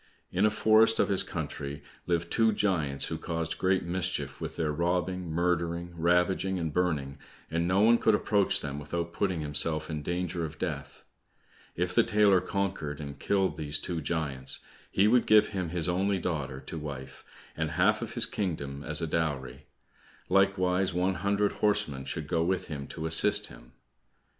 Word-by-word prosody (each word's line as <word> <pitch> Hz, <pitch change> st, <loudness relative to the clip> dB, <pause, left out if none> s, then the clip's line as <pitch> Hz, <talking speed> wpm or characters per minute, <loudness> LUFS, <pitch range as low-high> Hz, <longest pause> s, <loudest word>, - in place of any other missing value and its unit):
In 95 Hz, +4 st, +3 dB
a -, -, +3 dB
forest 110 Hz, +1 st, +4 dB
of -, -, +3 dB
his 95 Hz, -2 st, +3 dB
country 75 Hz, -2 st, -5 dB, 0.2 s
lived 85 Hz, -1 st, -1 dB
two 115 Hz, -1 st, +3 dB
giants 80 Hz, -10 st, 0 dB
who -, -, -4 dB
caused 80 Hz, -1 st, -3 dB
great 95 Hz, 0 st, +2 dB
mischief 85 Hz, -6 st, -3 dB
with -, -, -5 dB
their 80 Hz, -2 st, -1 dB
robbing, 90 Hz, +2 st, -1 dB
murdering, 85 Hz, +1 st, -1 dB
ravaging, 90 Hz, +3 st, +1 dB
and 80 Hz, -4 st, -3 dB
burning, 75 Hz, -6 st, -1 dB, 0.3 s
and 85 Hz, +1 st, 0 dB
no 95 Hz, +2 st, +3 dB
one 115 Hz, +2 st, +5 dB
could 110 Hz, -, +4 dB
approach 105 Hz, -1 st, +2 dB
them 70 Hz, -1 st, -5 dB
without 85 Hz, +3 st, -4 dB
putting 95 Hz, -4 st, -1 dB
himself 75 Hz, +2 st, +2 dB
in 75 Hz, -1 st, -3 dB
danger 85 Hz, +1 st, -2 dB
of 80 Hz, -1 st, -6 dB
death. -, -, -5 dB, 0.7 s
If 90 Hz, +1 st, -1 dB
the -, -, +5 dB
tailor 105 Hz, -3 st, +4 dB
conquered 95 Hz, -7 st, -3 dB
and 70 Hz, -2 st, -7 dB
killed 95 Hz, -2 st, 0 dB
these 75 Hz, -1 st, 0 dB
two 85 Hz, 0 st, -4 dB
giants, 70 Hz, -5 st, -2 dB, 0.3 s
he 100 Hz, -, +3 dB
would 120 Hz, +2 st, +3 dB
give 105 Hz, -1 st, +5 dB
him 95 Hz, -5 st, -3 dB
his 85 Hz, 0 st, -1 dB
only 95 Hz, +3 st, +1 dB
daughter 75 Hz, -7 st, -3 dB
to 80 Hz, -, -7 dB
wife, 65 Hz, -3 st, -8 dB, 0.3 s
and 80 Hz, 0 st, -2 dB
half 75 Hz, -, +2 dB
of -, -, -5 dB
his -, -, +4 dB
kingdom 70 Hz, -8 st, -4 dB
as 75 Hz, +3 st, -1 dB
a -, -, -1 dB
dowry, 70 Hz, -4 st, -3 dB, 0.6 s
likewise 95 Hz, -1 st, +2 dB
one 90 Hz, +2 st, +1 dB
hundred 100 Hz, +1 st, +1 dB
horsemen 100 Hz, -11 st, 0 dB
should 75 Hz, -, -4 dB
go 80 Hz, 0 st, +1 dB
with 95 Hz, +1 st, -1 dB
him 70 Hz, -3 st, -5 dB
to 80 Hz, -, -6 dB
assist 80 Hz, 0 st, +5 dB
him. -, -, -15 dB
85 Hz, 170 wpm, -29 LUFS, 75-95 Hz, 0.7 s, one